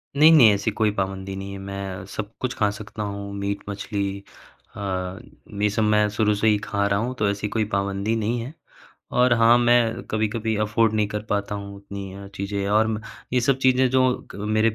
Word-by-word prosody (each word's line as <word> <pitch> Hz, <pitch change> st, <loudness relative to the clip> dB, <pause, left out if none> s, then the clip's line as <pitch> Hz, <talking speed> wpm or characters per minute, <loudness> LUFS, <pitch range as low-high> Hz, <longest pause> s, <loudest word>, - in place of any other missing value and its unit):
नहीं, 155 Hz, +3 st, +7 dB
नहीं। 120 Hz, -9 st, +8 dB
ऐसी 100 Hz, -, -1 dB
कोई 110 Hz, -2 st, +1 dB
पाबंदी 95 Hz, 0 st, -3 dB
नहीं 95 Hz, 0 st, -6 dB
है 100 Hz, -, -6 dB
मैं 95 Hz, -1 st, -6 dB
सब 105 Hz, +2 st, -5 dB
कुछ 125 Hz, -1 st, -1 dB
खा 105 Hz, -, +3 dB
सकता 105 Hz, +1 st, -7 dB
हूँ 100 Hz, 0 st, -5 dB
मीट-मछली 100 Hz, 0 st, -3 dB, 0.5 s
अ, -, -, -8 dB, 0.8 s
ये 105 Hz, -, +3 dB
सब 110 Hz, +2 st, 0 dB
मैं 105 Hz, 0 st, +3 dB
शुरू 105 Hz, 0 st, +1 dB
से 110 Hz, +2 st, +1 dB
ही 105 Hz, -, +5 dB
खा 100 Hz, -1 st, -1 dB
रहा 100 Hz, 0 st, +1 dB
हूँ। 125 Hz, +3 st, -2 dB
तो 105 Hz, -1 st, +2 dB
ऐसी 100 Hz, +1 st, -2 dB
कोई 110 Hz, -1 st, 0 dB
पाबंदी 100 Hz, +2 st, 0 dB
नहीं 115 Hz, +2 st, -1 dB
है। 125 Hz, +6 st, -6 dB, 0.6 s
और 125 Hz, 0 st, +3 dB
हाँ, 115 Hz, 0 st, +6 dB
मैं 120 Hz, -1 st, +3 dB
कभी-कभी 110 Hz, 0 st, -1 dB
अफ़ोर्ड 110 Hz, +1 st, +2 dB
नहीं 105 Hz, -1 st, +1 dB
कर 105 Hz, 0 st, -4 dB
पाता 100 Hz, 0 st, -1 dB
हूँ, 100 Hz, 0 st, -6 dB
उतनी 100 Hz, -1 st, -8 dB
अ, 100 Hz, 0 st, -9 dB
चीज़ें 100 Hz, 0 st, -3 dB
और 110 Hz, +2 st, +3 dB
म 110 Hz, -1 st, -2 dB, 0.3 s
ये 125 Hz, -, +3 dB
सब 135 Hz, +2 st, +2 dB
चीज़ें 130 Hz, 0 st, +4 dB
जो 130 Hz, -1 st, +2 dB
क -, -, -9 dB
मेरे 110 Hz, +2 st, +1 dB
अ, 110 Hz, -, -10 dB
105 Hz, 210 wpm, -24 LUFS, 100-115 Hz, 0.8 s, नहीं